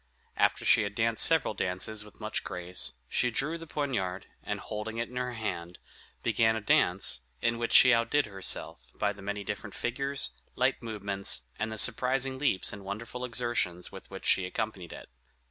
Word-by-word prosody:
After - - +2
she - - +6
had 100 -1 -3
danced 115 0 +3
several 160 -8 +4
dances 100 +3 -2
with 105 -2 -16
much - - -3
grace, 90 -6 -1
she 125 - +1
drew 150 +8 -1
the 165 - -9
poniard, 110 -12 -2 0.2
and - - -3
holding 110 +1 -5
it 115 - -2
in 125 - -12
her 125 0 -2
hand, 90 -6 -4 0.5
began 110 0 +3
a - - -1
dance, 105 - +3 0.2
in 115 0 0
which 115 - -1
she 125 - +8
outdid 115 +5 +2
herself, 95 -2 -1 0.2
by 105 -1 0
the 100 - -13
many 100 +1 -3
different 105 +1 -5
figures, 135 - -1 0.2
light - - +1
movements, 100 - -1 0.2
and 110 - -1
the 110 - -5
surprising 130 +3 +3
leaps 135 -10 +1
and 100 - -8
wonderful 115 +5 -6
exertions 120 -8 -1
with 95 - -11
which 95 0 -8
she 95 -1 +3
accompanied 100 -3 -4
it. - - -9
110 Hz, 180 wpm, -30 LUFS, 95-125 Hz, 0.5 s, she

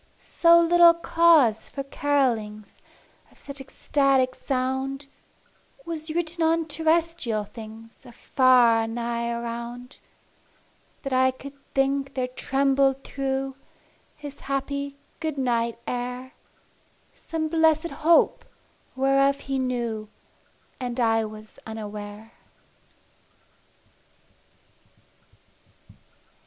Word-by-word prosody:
So 340 0 +4
little 340 0 +6
cause 330 -9 +3
for 275 - -5
carolings 240 -8 -1 0.5
Of - - -23
such 280 -1 -8
ecstatic 270 -1 +1
sound 265 +1 -2 0.8
Was 320 -1 -5
written 335 +1 -2
on 325 0 +2
terrestrial 320 -7 0
things 225 +1 -12
Afar 245 -2 +3
or - - -5
nigh 235 0 -3
around, 235 +2 -6 1.0
That 275 -2 -3
I 260 0 +4
could 270 +2 -9 0.2
think 275 0 0
there 255 -1 0
trembled 270 +1 +1
through 270 -1 -3 0.6
His 290 -1 -10
happy 280 +1 -3 0.2
good 315 -2 -3
night 235 -3 0
air 250 +2 -4 0.8
Some 320 -2 -4
blessed 320 0 +2
Hope, 330 +2 +4 0.5
whereof 275 +1 +2
he 270 -1 -2
knew, 235 -4 -3 0.7
And 250 -1 -4
I 225 -2 +2
was 215 0 -11
unaware. 210 0 -8
270 Hz, 90 wpm, -25 LUFS, 235-290 Hz, 1.0 s, little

